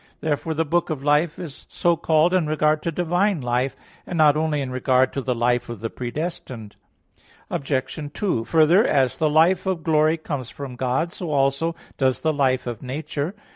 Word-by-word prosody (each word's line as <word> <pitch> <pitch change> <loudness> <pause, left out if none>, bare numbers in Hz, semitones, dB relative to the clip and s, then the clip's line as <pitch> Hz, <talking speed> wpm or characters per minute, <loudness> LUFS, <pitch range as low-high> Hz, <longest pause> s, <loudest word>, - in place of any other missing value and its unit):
Therefore 160 +1 -2
the 160 +1 0
book 175 +4 0
of 150 -4 -4
life 150 +3 +2
is 160 -6 -9
so 170 -1 +1
called 160 +1 +2
in 180 -4 +2
regard 155 0 +1
to 170 - -2
divine 175 +3 +1
life; 125 +1 -1 0.3
and 175 - -4
not 150 -2 +5
only 155 -1 0
in 135 -2 -3
regard 130 0 +2
to 135 - -2
the 125 -1 -1
life 120 +1 0
of 120 -3 -6
the 115 0 -4
predestined. 125 -5 -5 0.8
Obj. 135 +1 -2
2: 180 - -1
Further, 165 - +5
as 135 - +2
the 155 - +2
life 170 +5 +3
of 180 -4 -1
glory 155 0 +3
comes 145 -6 -5
from 140 -3 -8
God, 130 +8 -1
so 175 - -5
also 140 +3 +1 0.2
does 130 -2 +1
the 160 -1 +1
life 130 -3 +1
of 120 -3 -5
nature. 145 +6 -4
150 Hz, 185 wpm, -23 LUFS, 130-165 Hz, 0.8 s, not